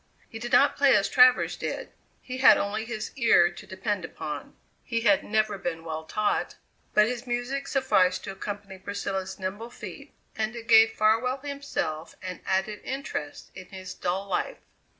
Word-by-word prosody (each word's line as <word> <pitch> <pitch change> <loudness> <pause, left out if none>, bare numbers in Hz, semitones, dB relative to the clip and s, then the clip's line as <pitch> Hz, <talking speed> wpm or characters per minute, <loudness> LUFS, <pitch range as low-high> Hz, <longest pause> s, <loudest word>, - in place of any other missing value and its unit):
He 225 - -8
did 240 +1 -5
not 280 - +5
play 280 -2 +5
as 200 -1 +3
Travers 250 0 +5
did - - -5 0.3
he 255 0 -6
had 265 - +8
only 210 +2 -2
his 220 -2 -5
ear 220 -8 +5
to 175 - -12
depend 190 0 -3
upon; 150 -3 -6 0.3
he 230 -1 -2
had 205 -4 +4
never 215 -2 0
been 165 -2 -4
well 160 -1 -5
taught 210 +5 -1 0.4
but 210 - +7
his 245 +2 -4
music 245 +3 -2
sufficed 195 -10 +2
to - - -5
accompany 200 0 -7
Priscilla's 195 -1 -4
nimble 200 +4 -5
feet, - - -10 0.2
and 220 +1 -2
it 230 -1 -7
gave 225 0 +7
Farwell 225 +5 +2
himself 280 - -4
an 185 -1 -6
added 190 +2 0
interest 260 - -5
in 185 -1 -10
his 190 -1 -8
dull 185 +2 -2
life. 190 - -2
210 Hz, 170 wpm, -27 LUFS, 190-240 Hz, 0.4 s, had